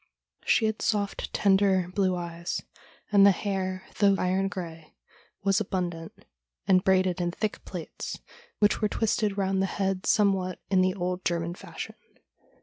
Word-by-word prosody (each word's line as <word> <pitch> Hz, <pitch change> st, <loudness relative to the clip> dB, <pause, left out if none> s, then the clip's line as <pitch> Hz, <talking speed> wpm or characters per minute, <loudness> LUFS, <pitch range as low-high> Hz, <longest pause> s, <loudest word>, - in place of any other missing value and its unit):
She 225 Hz, -, +3 dB
had 220 Hz, 0 st, -1 dB
soft, 205 Hz, -2 st, -1 dB
tender, 190 Hz, -2 st, +3 dB
blue 190 Hz, -2 st, +2 dB
eyes, 170 Hz, -1 st, -4 dB, 0.5 s
and 200 Hz, -1 st, +6 dB
the 200 Hz, -, +9 dB
hair, 190 Hz, -1 st, -1 dB, 0.2 s
though 200 Hz, -1 st, +5 dB
iron 190 Hz, +1 st, +1 dB
grey, 165 Hz, -5 st, -7 dB, 0.5 s
was 195 Hz, +1 st, +3 dB
abundant, 175 Hz, -4 st, -4 dB, 0.4 s
and 185 Hz, -1 st, +5 dB
braided 185 Hz, -1 st, +2 dB
in 175 Hz, -, 0 dB
thick 210 Hz, +4 st, -3 dB
plaits, 175 Hz, -4 st, -6 dB, 0.4 s
which 205 Hz, +1 st, +2 dB
were 210 Hz, -, +2 dB
twisted 210 Hz, -2 st, 0 dB
round 190 Hz, -1 st, +1 dB
the 195 Hz, -, +1 dB
head 195 Hz, -1 st, -2 dB
somewhat 190 Hz, -3 st, +2 dB
in 190 Hz, -1 st, +5 dB
the 185 Hz, +1 st, +2 dB
old 180 Hz, -1 st, -2 dB
German 170 Hz, 0 st, -1 dB
fashion. -, -, -8 dB
190 Hz, 145 wpm, -27 LUFS, 180-200 Hz, 0.5 s, the